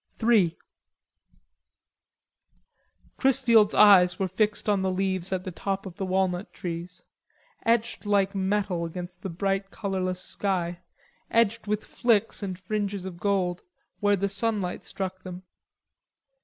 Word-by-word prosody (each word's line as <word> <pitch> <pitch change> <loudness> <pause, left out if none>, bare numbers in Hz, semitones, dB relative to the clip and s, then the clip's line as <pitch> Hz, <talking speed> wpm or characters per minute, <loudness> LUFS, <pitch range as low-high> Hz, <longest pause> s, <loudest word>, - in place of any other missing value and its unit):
III 195 -8 +4 2.6
Chrisfield's 240 -6 +4
eyes 185 -4 +7
were 190 - 0
fixed 210 +4 0
on 205 -2 +2
the 190 - 0
leaves 185 -1 -1
at 185 -1 -1
the 185 - -5
tops 195 +3 -3
of 185 -2 -9
the 195 - -2
walnut 185 0 0
trees, 175 +1 -6 0.6
etched 230 -2 +1
like 200 -1 +2
metal 190 -2 0
against 175 +1 -7
the 195 - -4
bright 195 +2 -1
colorless 185 -3 -3
sky, 180 -3 -2 0.5
edged 230 -1 +2
with 210 0 -1
flicks 225 -3 +1
and 190 -3 -4
fringes 200 0 -3
of 180 -2 -7
gold 185 -3 0 0.4
where 205 0 +3
the 200 +1 0
sunlight 200 -2 -2
struck 185 -1 -5
them. 185 0 -8
195 Hz, 130 wpm, -26 LUFS, 185-205 Hz, 2.6 s, eyes